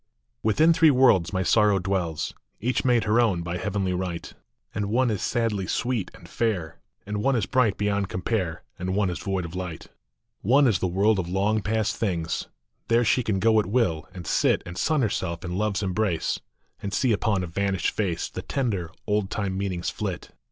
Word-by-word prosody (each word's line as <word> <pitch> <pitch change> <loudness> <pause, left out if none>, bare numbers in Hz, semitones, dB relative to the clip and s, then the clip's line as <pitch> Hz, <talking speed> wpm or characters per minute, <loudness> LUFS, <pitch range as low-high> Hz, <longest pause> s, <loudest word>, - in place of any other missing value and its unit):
ITHIN 155 +10 +4
three 160 -1 +5
worlds 125 - +4
my 95 -1 0
Sorrow 105 +1 +4
dwells; 90 -4 -2 0.3
Each 125 +3 0
made 120 -3 +3
her 110 +3 +3
own 95 -8 +1
by 85 +1 -3
heavenly 95 -1 -1
right;,... 90 -2 -4 0.4
And 105 -1 -2
one 120 +3 +2
is 105 - -2
sadly 110 -6 0
sweet 120 -6 -1
and - - -14
fair, 100 -9 -2 0.3
And 105 +1 -3
one 135 +4 +2
is 110 -5 +1
bright 110 -1 +2
beyond 100 -1 0
compare, 90 -5 -2 0.2
And 95 +1 -2
one 100 -3 +1
is 90 - -5
void 95 -2 -2
of 85 - -8
light. 90 -3 -6 0.5
One 135 +7 +4
is 110 -7 +3
the 95 - 0
world 100 +3 +2
of 85 -2 -3
long 100 +4 +1
past 110 0 0
things; 85 -6 -2 0.4
There 115 +1 +3
she 125 - +3
can 110 -4 -1
go 110 +3 +4
at 105 - 0
will, 100 -8 0
and 90 -2 -9
sit - - +2
And 90 - -7
sun 150 - +1
herself 90 -5 -2
in 90 0 -3
love 105 +1 0
s 105 - -1
embrace, 95 -3 0 0.4
And 100 - -4
see 125 +4 +2
upon 105 -3 +1
a - - -2
vanished 95 +2 -1
face 90 -6 -1
The - - -6
tender, 105 -11 -2 0.2
old 105 -2 0
time 100 -3 -2
meanings 95 -3 -2
flit. - - -5
100 Hz, 195 wpm, -25 LUFS, 90-110 Hz, 0.5 s, three